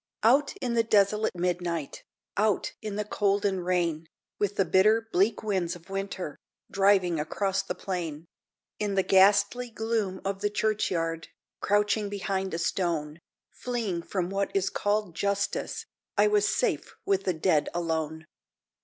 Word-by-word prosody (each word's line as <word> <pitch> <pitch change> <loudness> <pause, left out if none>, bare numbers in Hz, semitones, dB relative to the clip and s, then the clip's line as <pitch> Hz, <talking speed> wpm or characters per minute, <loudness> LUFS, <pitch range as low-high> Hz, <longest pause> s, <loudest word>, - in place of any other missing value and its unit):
Out 270 +6 +4
in 245 -3 -2
the 230 - +4
desolate 210 -2 +2
midnight, 175 -4 -2 0.3
Out 210 -1 +1
in 215 -2 -4
the 210 0 -2
cold 205 -1 +1
and 190 -3 0
rain, 170 -3 0 0.3
With 205 -1 0
the 195 - +2
bitter, 215 +6 +4
bleak 205 +5 +2
winds 190 -5 -1
of 175 +2 -14
winter 195 -5 -4 0.3
Driving 195 -4 +3
across 195 +5 0
the - - -5
plain 165 -5 -4 0.5
In 205 -2 -1
the 190 - +3
ghastly 200 +6 +4
gloom 220 -4 -2
of 195 0 -2
the 205 - +1
churchyard, 180 -6 -1 0.3
Crouching 205 0 +1
behind 195 -1 -2
a - - -1
stone, 165 -3 -1 0.3
Fleeing 225 -8 -3
from 180 +1 -3
what 195 0 0
is 195 0 +1
called 205 -3 0
Justice, 200 +1 -1 0.3
I 205 - +6
was 210 -1 +3
safe 145 - -1
with 195 -1 +1
the 185 - +2
dead 160 -2 +2
alone. 160 -2 -2
195 Hz, 145 wpm, -28 LUFS, 175-210 Hz, 0.5 s, I